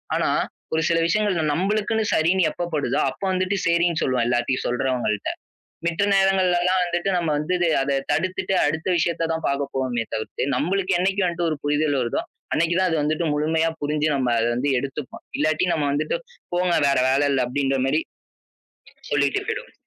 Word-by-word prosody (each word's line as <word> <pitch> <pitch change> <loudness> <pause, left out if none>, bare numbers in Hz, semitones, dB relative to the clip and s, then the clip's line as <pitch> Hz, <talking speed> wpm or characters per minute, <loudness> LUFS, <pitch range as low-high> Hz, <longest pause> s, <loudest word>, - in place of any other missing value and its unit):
ஆனா, - - +1 0.4
ஒரு 160 - +1
சில 165 - +3
விஷயங்கள் 175 -5 +1
நம்மளுக்குன்னு 215 +5 0
சரின்னு 170 +1 +3
எப்ப 175 0 -4
படுதோ, 145 - 0
அப்ப - - -12
வந்துட்டு 185 +2 0
சரின்னு 170 -1 +2
சொல்வோம், 125 -2 +1
எல்லாத்தையும் 120 +2 0
சொல்றவங்கள்ட. 125 -4 -1 0.6
மித்த 170 +3 +1
நேரங்கள்ல 195 -2 +3
எல்லாம் 185 +1 +2
வந்துட்டு 175 +1 -2
நம்ம 175 -2 0
வந்து 150 +5 -1 0.3
அத 135 0 0
தடுத்துட்டு, 185 +5 0
அடுத்த 160 +1 -2
விஷயத்தை 170 0 0
தான் 160 0 -3
பாக்கப் 140 0 -2
போனுமே 125 -3 -1
தவிர்த்து, 110 +3 -3
நம்மளுக்கு 195 +2 0
என்னைக்கு 190 +2 +1
வந்துட்டு 175 -1 -1
ஒரு 155 - -1
புரிதல் 145 0 +1
வருதோ, 120 -2 0 0.3
அன்னைக்கு 170 +2 +1
தான் 185 0 +3
அது 165 - +1
வந்துட்டு 155 +3 0
முழுமையா 160 +2 +1
புரிஞ்சு, 150 +1 0
நம்ம 125 -3 +1
அதை 115 +1 +1
வந்து 135 +4 0
எடுத்துப்போம். 135 +1 -6 0.2
இல்லாட்டி, 155 +4 +1
நம்ம 150 -2 0
வந்துட்டு 150 - -1 0.4
"போங்க, 180 0 +1
வேற 140 - +3
வேலை 140 +2 +3
இல்ல," 135 -2 +2
அப்படின்ற 135 +1 0
மாரி 150 +4 +2 1.1
சொல்லிட்டு 140 -1 +1
போயிடுவோம். - - -4
155 Hz, 165 wpm, -23 LUFS, 140-180 Hz, 1.1 s, சில